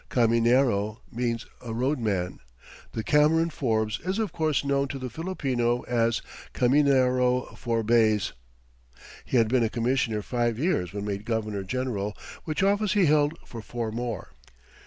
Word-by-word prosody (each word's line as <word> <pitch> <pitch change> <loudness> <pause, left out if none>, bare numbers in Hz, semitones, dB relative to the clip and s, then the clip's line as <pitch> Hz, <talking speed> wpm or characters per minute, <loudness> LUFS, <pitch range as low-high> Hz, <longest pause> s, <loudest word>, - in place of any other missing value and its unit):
Caminero 115 -2 +2
means 120 0 -2 0.2
a 115 -2 -5
road 130 +5 0
man, 95 -6 -2 0.5
and 110 - -4
Cameron 160 +4 +3
Forbes 110 -6 -1
is 185 +3 -1
of 220 -3 -2
course 155 -3 0
known 140 0 +1
to 135 - -5
the 130 -2 -6
Filipino 125 - -1
as 115 -1 0 0.3
"Caminero 125 -2 +3
Forbays." 115 -2 +2 0.9
He 130 - 0
had 115 -2 +4
been 125 +2 +2
a 110 - +1
commissioner 115 -2 0
five 120 -1 -1
years 135 - 0
when 100 +1 -5
made 100 -1 -3
governor 110 -3 -2
general, 105 -2 -3 0.3
which 155 +3 -1
office 205 +1 +2
he 200 -3 +4
held 150 +1 +3
for 115 - -8
four 115 0 -4
more. 115 -3 -4
120 Hz, 145 wpm, -26 LUFS, 110-140 Hz, 0.9 s, had